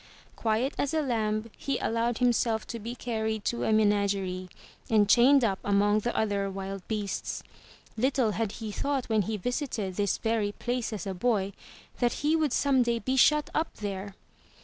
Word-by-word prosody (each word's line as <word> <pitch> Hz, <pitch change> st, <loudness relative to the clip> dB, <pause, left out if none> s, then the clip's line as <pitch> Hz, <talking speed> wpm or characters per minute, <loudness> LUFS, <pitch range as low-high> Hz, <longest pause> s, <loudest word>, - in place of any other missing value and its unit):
Quiet 230 Hz, +5 st, 0 dB
as 285 Hz, +3 st, 0 dB
a 310 Hz, -, +2 dB
lamb, 220 Hz, -3 st, -1 dB
he 275 Hz, -2 st, -2 dB
allowed 230 Hz, +1 st, 0 dB
himself 235 Hz, -2 st, +1 dB
to 230 Hz, -, -4 dB
be 230 Hz, +3 st, -6 dB
carried 220 Hz, -3 st, -2 dB
to 235 Hz, -, -1 dB
a -, -, +1 dB
menagerie, 200 Hz, -3 st, +1 dB, 0.4 s
and 210 Hz, -2 st, +4 dB
chained 255 Hz, +5 st, +6 dB
up 195 Hz, -4 st, +1 dB
among 205 Hz, +1 st, +3 dB
the 240 Hz, +3 st, -2 dB
other 200 Hz, -2 st, 0 dB
wild 195 Hz, 0 st, -5 dB
beasts. 210 Hz, -3 st, -3 dB, 0.5 s
Little 255 Hz, -1 st, +2 dB
had 215 Hz, -1 st, -2 dB
he 220 Hz, -2 st, -6 dB
thought 275 Hz, +4 st, -1 dB
when 220 Hz, -1 st, +3 dB
he 215 Hz, +3 st, -2 dB
visited 225 Hz, -, -3 dB
this 200 Hz, -2 st, +1 dB
very 220 Hz, -2 st, 0 dB
place 245 Hz, +1 st, -2 dB
as 215 Hz, -1 st, -5 dB
a 195 Hz, -, -3 dB
boy 200 Hz, 0 st, 0 dB, 0.5 s
that 240 Hz, -2 st, +2 dB
he 310 Hz, +2 st, +4 dB
would 310 Hz, -4 st, +1 dB
some 275 Hz, 0 st, +3 dB
day 235 Hz, -1 st, +1 dB
be 255 Hz, +4 st, -1 dB
shut 300 Hz, +3 st, +4 dB
up 315 Hz, -, -1 dB
there! 200 Hz, -1 st, -5 dB
220 Hz, 175 wpm, -28 LUFS, 205-245 Hz, 0.5 s, chained